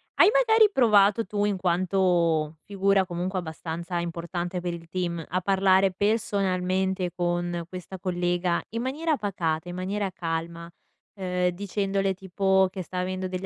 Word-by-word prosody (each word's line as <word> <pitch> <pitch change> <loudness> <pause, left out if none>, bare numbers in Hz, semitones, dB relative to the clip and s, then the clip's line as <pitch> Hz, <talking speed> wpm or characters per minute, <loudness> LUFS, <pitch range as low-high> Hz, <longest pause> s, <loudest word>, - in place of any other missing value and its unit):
hai - - +7
magari 445 -4 +5
provato 215 -3 +4
tu, 205 -1 -1
in 205 -2 0
quanto 175 -3 +1
figura 195 -1 +2
comunque 180 +2 -3
abbastanza 170 +1 -5
importante 175 +1 -4
per 175 0 -3
il 165 -1 -9
team, 170 -2 -2
a 185 - -1
parlare 190 0 +3
personalmente 190 -3 0
con 175 -1 -1
questa 185 +1 -8
collega, 175 -1 0
in 230 +1 -3
maniera 305 +4 0
pacata, 175 -5 -2
in 175 - -6
maniera 195 +2 -2
calma, 170 0 -4 0.5
ehm, 180 -2 0
dicendole 195 0 -1
tipo 190 0 +2
che 190 - -5
sta 180 - -8
avendo 185 +1 -2
degli 185 +1 -4
185 Hz, 145 wpm, -26 LUFS, 175-195 Hz, 0.5 s, hai